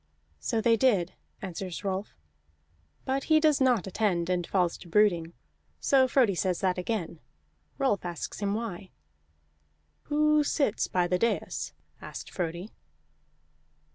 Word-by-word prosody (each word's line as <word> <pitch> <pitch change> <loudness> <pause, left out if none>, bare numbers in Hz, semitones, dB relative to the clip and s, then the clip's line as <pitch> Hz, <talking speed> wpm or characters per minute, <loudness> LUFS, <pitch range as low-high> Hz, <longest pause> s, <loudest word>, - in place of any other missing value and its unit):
"So 220 - -1
they 230 0 +4
did," 205 -9 +2 0.3
answers 185 0 -5
Rolf. 195 +1 -3 0.9
But 265 +1 -1
he 315 -1 +5
does 305 -3 +3
not 250 -7 +3
attend, 185 -3 0
and 175 -2 -1
falls 180 -3 +1
to - - -12
brooding. 170 -3 +2 0.5
So 265 -2 +4
Frodi 250 -5 +3
says 180 0 0
that 185 -2 +1
again. 180 -4 -3 0.6
Rolf 265 -8 +1
asks 175 -1 -5
him 200 -1 0
why. 210 -4 -5 1.2
"Who 300 0 +3
sits 280 -6 0
by 180 -1 +1
the 180 +1 0
dais?" 230 - -1 0.3
asked - - -8
Frodi. 175 +3 -4
200 Hz, 130 wpm, -28 LUFS, 180-250 Hz, 1.2 s, he